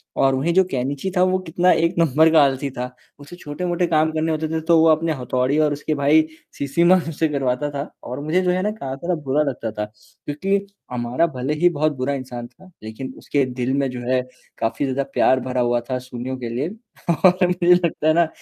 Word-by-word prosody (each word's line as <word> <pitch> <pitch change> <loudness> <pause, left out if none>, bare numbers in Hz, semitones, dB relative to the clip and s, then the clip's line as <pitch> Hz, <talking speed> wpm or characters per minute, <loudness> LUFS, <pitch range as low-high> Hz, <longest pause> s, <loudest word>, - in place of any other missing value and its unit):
और 135 0 +3
वहीं 150 +6 0
जो 190 +2 +5
केनिची 135 +6 -2
था - - +4
वो 185 0 +2
कितना 180 0 +2
एक 170 +2 +2
नंबर 160 0 +4
का 160 -1 +6
आलसी 140 0 0
था। 125 +1 -3 0.3
उसे 145 +4 -11
छोटे-मोटे 175 +2 -2
काम 160 -1 +2
करने 160 +1 -1
होते 155 0 -1
थे 160 0 -1
तो 170 -1 +6
वो 160 - +5
अपने 160 +1 +2
हथौड़ी 130 +2 0
और 150 -1 +3
उसके 150 +2 -2
भाई 145 +2 +4 0.4
शिशिमारू 170 +5 +2
से 160 +1 0
करवाता 140 0 -1
था, 140 +1 -4 0.2
और 125 +3 -6
मुझे 160 +5 +1
जो 180 -1 +1
है 180 +1 0
ना 210 +2 0
कराता 140 -5 -6
था, 180 - +2
बुरा 145 +2 +1
लगता 115 -4 -5
था, 105 0 -3
क्योंकि 145 - -4 0.4
अमारा 125 +7 0
भले 130 +4 -1
ही 175 - +6
बहुत 155 +1 +2
बुरा 130 +2 -1
इंसान 125 -3 -6
था, 130 +10 -19
लेकिन 120 +4 -7
उसके 140 -2 0
दिल 125 +1 -1
में 140 -1 +1
जो 125 - -6
है 130 0 +3 0.4
काफ़ी 115 +5 -1
ज़्यादा 135 +1 -1
प्यार 130 - +4
भरा 125 -1 0
हुआ 120 0 +2
था 130 - 0
सुनिओ 125 +2 -5
के 120 -2 -5
लिए। 130 +7 -2 0.6
और 180 0 +5
मुझे 180 0 +4
लगता 170 -3 +1
है 155 - +5
ना, 170 0 +3
145 Hz, 220 wpm, -21 LUFS, 130-170 Hz, 0.6 s, का